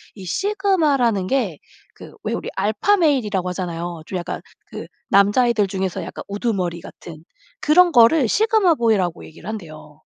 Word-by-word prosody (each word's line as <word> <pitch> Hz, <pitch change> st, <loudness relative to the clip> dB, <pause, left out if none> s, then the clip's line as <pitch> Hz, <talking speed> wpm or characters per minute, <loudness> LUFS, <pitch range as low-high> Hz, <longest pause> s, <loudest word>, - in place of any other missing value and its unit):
이 195 Hz, -, -10 dB
sigma 385 Hz, -, +1 dB
라는 220 Hz, -7 st, 0 dB
게 215 Hz, -, -1 dB, 0.4 s
그 -, -, -13 dB
왜 -, -, -2 dB
우리 -, -, -4 dB
alpha 215 Hz, -, +1 dB
male 295 Hz, -, +2 dB
이라고 190 Hz, -3 st, -2 dB
하잖아요. 175 Hz, -2 st, -5 dB
좀 185 Hz, -, -5 dB
약간 175 Hz, -, -6 dB, 0.3 s
그 -, -, -8 dB, 0.2 s
남자애들 210 Hz, +2 st, +3 dB
중에서 190 Hz, -1 st, -3 dB
약간 -, -, -8 dB
우두머리 195 Hz, -5 st, -2 dB
같은 160 Hz, -2 st, -12 dB, 0.4 s
그런 350 Hz, +3 st, +4 dB
거를 250 Hz, +4 st, +5 dB
sigma 425 Hz, -, +3 dB
boy 230 Hz, -2 st, +3 dB
라고 175 Hz, -3 st, -3 dB
얘기를 160 Hz, -, -13 dB
한대요. 155 Hz, -7 st, -9 dB
205 Hz, 400 characters per minute, -20 LUFS, 180-285 Hz, 0.4 s, 거를